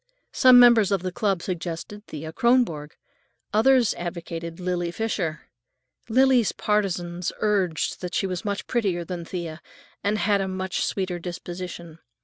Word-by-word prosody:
Some 255 Hz, -2 st, +7 dB
members 235 Hz, -5 st, +6 dB
of 195 Hz, -3 st, +1 dB
the 185 Hz, -, -2 dB
club 195 Hz, -2 st, -1 dB
suggested 180 Hz, +3 st, -5 dB
Thea 155 Hz, +1 st, -7 dB
Kronborg, 230 Hz, -12 st, +2 dB, 0.6 s
others 240 Hz, +2 st, +4 dB
advocated 170 Hz, -1 st, -6 dB
Lily 180 Hz, -1 st, -1 dB
Fisher. 175 Hz, -6 st, -2 dB, 0.7 s
Lily's 255 Hz, -1 st, +4 dB
partisans 180 Hz, -4 st, -1 dB
urged 195 Hz, -6 st, 0 dB
that 180 Hz, -1 st, -4 dB
she -, -, +1 dB
was 185 Hz, 0 st, -3 dB
much 200 Hz, -2 st, -3 dB
prettier 195 Hz, -8 st, -1 dB
than 175 Hz, 0 st, -5 dB
Thea, 170 Hz, -2 st, -6 dB, 0.4 s
and 205 Hz, +1 st, +1 dB
had 205 Hz, -1 st, +2 dB
a 190 Hz, -, -1 dB
much 185 Hz, 0 st, -2 dB
"sweeter 185 Hz, -3 st, -2 dB
disposition." 175 Hz, -1 st, -7 dB
185 Hz, 135 wpm, -25 LUFS, 170-210 Hz, 0.7 s, Some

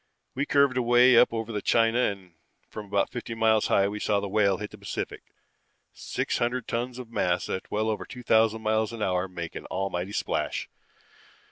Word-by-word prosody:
We 140 Hz, +3 st, -2 dB
curved 140 Hz, -3 st, +3 dB
away 120 Hz, +1 st, +5 dB
up 125 Hz, -, +6 dB
over 115 Hz, -2 st, -3 dB
China 115 Hz, +2 st, +3 dB
and 100 Hz, -7 st, -2 dB, 0.3 s
from 105 Hz, -1 st, -8 dB
about 100 Hz, 0 st, 0 dB
fifty 115 Hz, -2 st, -5 dB
miles 110 Hz, -1 st, +3 dB
high 100 Hz, 0 st, +3 dB
we 105 Hz, +1 st, -4 dB
saw 105 Hz, -1 st, +1 dB
the 100 Hz, -, -4 dB
Whale 100 Hz, -1 st, +2 dB
hit 105 Hz, 0 st, -6 dB
the -, -, -11 dB
Pacific. -, -, -5 dB, 0.7 s
Six -, -, -3 dB
hundred 120 Hz, 0 st, -1 dB
tons 120 Hz, +1 st, -3 dB
of 125 Hz, -3 st, -9 dB
mass 90 Hz, -5 st, 0 dB
at 95 Hz, -, -4 dB
well 110 Hz, +1 st, -1 dB
over 110 Hz, -1 st, -2 dB
two 125 Hz, -1 st, -10 dB
thousand 110 Hz, -1 st, +3 dB
miles 110 Hz, 0 st, +1 dB
an 115 Hz, -2 st, -4 dB
hour 90 Hz, -1 st, 0 dB
make 85 Hz, -3 st, -6 dB
an -, -, -8 dB
almighty 95 Hz, 0 st, -3 dB
splash. -, -, -2 dB
110 Hz, 190 wpm, -27 LUFS, 100-120 Hz, 0.7 s, up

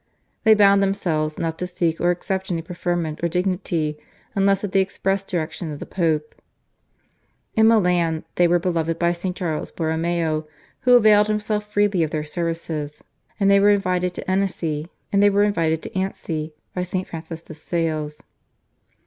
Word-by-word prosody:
They 220 Hz, 0 st, +7 dB
bound 200 Hz, -1 st, +5 dB
themselves 160 Hz, -6 st, 0 dB
not 165 Hz, -1 st, -3 dB
to 180 Hz, -, -2 dB
seek 170 Hz, -2 st, -1 dB
or 175 Hz, -, +3 dB
accept 190 Hz, +2 st, -2 dB
any 165 Hz, -2 st, -2 dB
preferment 175 Hz, -2 st, -2 dB
or -, -, +3 dB
dignity 175 Hz, -4 st, -1 dB, 0.3 s
unless 195 Hz, -1 st, +2 dB
at 205 Hz, -, -3 dB
the 195 Hz, -, +3 dB
express 195 Hz, 0 st, 0 dB
direction 170 Hz, -2 st, -3 dB
of 145 Hz, -, -6 dB
the -, -, -6 dB
Pope. 155 Hz, -4 st, -1 dB, 1.2 s
In 220 Hz, 0 st, +5 dB
Milan 180 Hz, -7 st, +2 dB
they 175 Hz, -, +4 dB
were 175 Hz, +1 st, +4 dB
beloved 165 Hz, -2 st, -1 dB
by 170 Hz, 0 st, +2 dB
St. 175 Hz, +1 st, -3 dB
Charles 165 Hz, -5 st, -2 dB
Borromeo 160 Hz, -1 st, -1 dB, 0.4 s
who 250 Hz, -, +9 dB
availed 210 Hz, -3 st, +6 dB
himself 210 Hz, 0 st, -2 dB
freely 205 Hz, -3 st, +2 dB
of 160 Hz, -, +1 dB
their 155 Hz, 0 st, -2 dB
services, 160 Hz, -2 st, -4 dB, 0.4 s
and 200 Hz, -1 st, +4 dB
they 200 Hz, -, +6 dB
were 205 Hz, +1 st, +5 dB
invited 180 Hz, -3 st, +1 dB
to -, -, -7 dB
Annecy 175 Hz, -5 st, -1 dB, 0.3 s
by 180 Hz, -4 st, 0 dB
St. 185 Hz, +1 st, -3 dB
Francis 165 Hz, 0 st, -7 dB
de -, -, -10 dB
Sales. 155 Hz, -2 st, -3 dB
175 Hz, 150 wpm, -22 LUFS, 160-195 Hz, 1.2 s, who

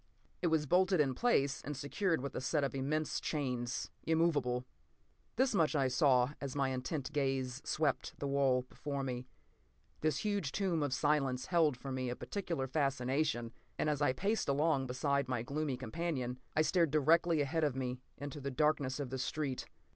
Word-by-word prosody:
It 175 Hz, -, +2 dB
was 160 Hz, -2 st, +2 dB
bolted 185 Hz, +3 st, +3 dB
in 135 Hz, -3 st, +3 dB
place 140 Hz, -, +2 dB
and 145 Hz, -1 st, -5 dB
secured 160 Hz, +3 st, 0 dB
with 140 Hz, -, -4 dB
a -, -, -3 dB
set 135 Hz, +2 st, +1 dB
of 140 Hz, -, -1 dB
immense 150 Hz, +3 st, -1 dB
chains, 125 Hz, -5 st, -2 dB
immovable. 145 Hz, -7 st, +1 dB, 0.7 s
This 260 Hz, +1 st, +2 dB
much 165 Hz, -5 st, +2 dB
I 135 Hz, -3 st, +3 dB
saw 125 Hz, 0 st, +3 dB
as 140 Hz, -1 st, -4 dB
my 135 Hz, -2 st, +1 dB
intent 130 Hz, +3 st, -3 dB
gaze 135 Hz, -2 st, -1 dB
swept 150 Hz, -4 st, 0 dB
the -, -, -4 dB
wall 135 Hz, -2 st, +2 dB
before 140 Hz, +2 st, -4 dB
me. 125 Hz, -1 st, -4 dB, 0.7 s
This 155 Hz, -3 st, +1 dB
huge 200 Hz, -9 st, 0 dB
tomb 185 Hz, -5 st, 0 dB
of 145 Hz, -2 st, 0 dB
silence 135 Hz, -3 st, +1 dB
held 160 Hz, -7 st, +3 dB
for 135 Hz, +2 st, -6 dB
me 130 Hz, -1 st, -2 dB
a 120 Hz, -, -2 dB
peculiar 170 Hz, -7 st, -3 dB
fascination, 135 Hz, -3 st, 0 dB, 0.2 s
and 150 Hz, -, +1 dB
as 150 Hz, -1 st, -2 dB
I 145 Hz, -, +4 dB
paced 200 Hz, +7 st, 0 dB
along 140 Hz, -1 st, +2 dB
beside 140 Hz, +2 st, 0 dB
my 125 Hz, -3 st, -1 dB
gloomy 140 Hz, 0 st, -2 dB
companion, 130 Hz, -3 st, -3 dB, 0.2 s
I 155 Hz, -, +4 dB
stared 170 Hz, -1 st, +3 dB
directly 160 Hz, +3 st, +4 dB
ahead 160 Hz, +3 st, 0 dB
of 145 Hz, -4 st, +1 dB
me 125 Hz, -1 st, -3 dB, 0.2 s
into 145 Hz, 0 st, -6 dB
the 140 Hz, -, -2 dB
darkness 140 Hz, -1 st, +1 dB
of 135 Hz, -3 st, -4 dB
the 130 Hz, -, -3 dB
street. 135 Hz, -1 st, -2 dB
140 Hz, 175 wpm, -34 LUFS, 130-155 Hz, 0.7 s, I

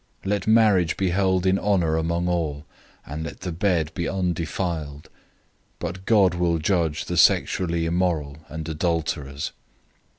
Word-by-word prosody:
013:004 95 Hz, -, -4 dB
Let 100 Hz, -1 st, -1 dB
marriage 105 Hz, -7 st, +4 dB
be 95 Hz, -2 st, +1 dB
held 95 Hz, -1 st, +1 dB
in 95 Hz, +1 st, +3 dB
honor 90 Hz, -6 st, +1 dB
among 85 Hz, +2 st, 0 dB
all, 80 Hz, -4 st, -2 dB, 0.4 s
and 75 Hz, +3 st, -5 dB
let 80 Hz, +2 st, -8 dB
the 90 Hz, -1 st, -4 dB
bed 85 Hz, -2 st, 0 dB
be 85 Hz, -, -2 dB
undefiled: 85 Hz, -4 st, -3 dB, 0.7 s
but 95 Hz, +1 st, -6 dB
God 100 Hz, -5 st, +5 dB
will 85 Hz, -1 st, +1 dB
judge 80 Hz, -2 st, 0 dB
the -, -, -3 dB
sexually 85 Hz, -2 st, +3 dB
immoral 80 Hz, -4 st, 0 dB
and 80 Hz, +1 st, -6 dB
adulterers. 80 Hz, -3 st, -2 dB
85 Hz, 140 wpm, -24 LUFS, 80-95 Hz, 0.7 s, God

